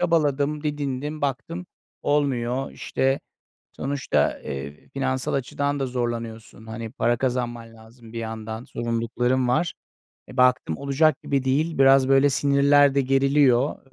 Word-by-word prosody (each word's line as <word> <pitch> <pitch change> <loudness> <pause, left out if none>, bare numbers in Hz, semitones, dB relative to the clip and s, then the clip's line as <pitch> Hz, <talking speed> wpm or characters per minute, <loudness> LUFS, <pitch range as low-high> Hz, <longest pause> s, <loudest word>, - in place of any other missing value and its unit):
Çabaladım, 150 -4 +1
didindim, 145 0 -3
baktım 145 +6 -3 0.4
olmuyor 135 -3 0
işte. 135 +1 -1 0.5
Sonuçta, 135 - -1
eee, 70 +2 -7
finansal 130 -1 -2
açıdan 140 +1 -1
da 135 - 0
zorlanıyorsun. 115 -3 -5
Hani, 110 0 -6
para 120 -3 +1
kazanman 120 -2 -3
lazım 115 +1 -16
bir 115 - -5
yandan, 110 0 -5
zorunlulukların 120 +2 -1
var. 155 +7 +1 0.5
E, 125 - -11
baktım 125 -10 +3
olacak 140 +1 +2
gibi 135 -2 -1
değil, 150 +5 0
biraz 135 -1 +6
böyle 135 +1 +5
sinirler 140 +1 +4
de 140 - +3
geriliyor 135 0 +3
130 Hz, 125 wpm, -24 LUFS, 120-140 Hz, 0.5 s, biraz